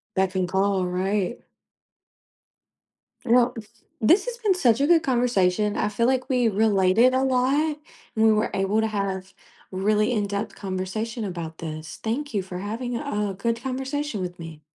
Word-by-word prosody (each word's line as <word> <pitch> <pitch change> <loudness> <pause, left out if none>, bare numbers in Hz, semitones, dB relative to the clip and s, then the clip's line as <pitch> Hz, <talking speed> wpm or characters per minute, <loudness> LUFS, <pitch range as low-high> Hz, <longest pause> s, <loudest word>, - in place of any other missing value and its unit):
Beck 190 0 +1
and 185 -1 +1
call, 190 0 +1
right. 190 +4 -1 1.8
Well, 245 +1 +4 0.5
this 340 - +4
has 485 -1 -4
been 415 -6 +1
such 245 -7 +3
a 285 - +3
good 335 -2 +5
conversation. 210 -5 +1
I - - +1
feel 235 +3 +1
like 260 -1 +1
we 250 -3 +2
related 210 +3 +3
a 260 - +2
lot 270 +4 +1 0.4
and 220 0 +3
we 220 - +6
were 215 +1 +1
able 195 +3 +1
to 220 - +1
have 195 -2 -3 0.4
really 210 +4 +1
in-depth 205 -1 -2
conversation 205 +4 -4
about 170 -4 -6
this. 155 -1 -7
Thank 255 +4 -2
you 200 - +1
for 180 -1 -7
having 235 +5 -4
a, - - -4
uh, 210 -8 -2
good 230 +4 -2
conversation 265 -2 -3
with 175 -1 -5
me. 165 -2 -9
215 Hz, 165 wpm, -24 LUFS, 190-250 Hz, 1.8 s, we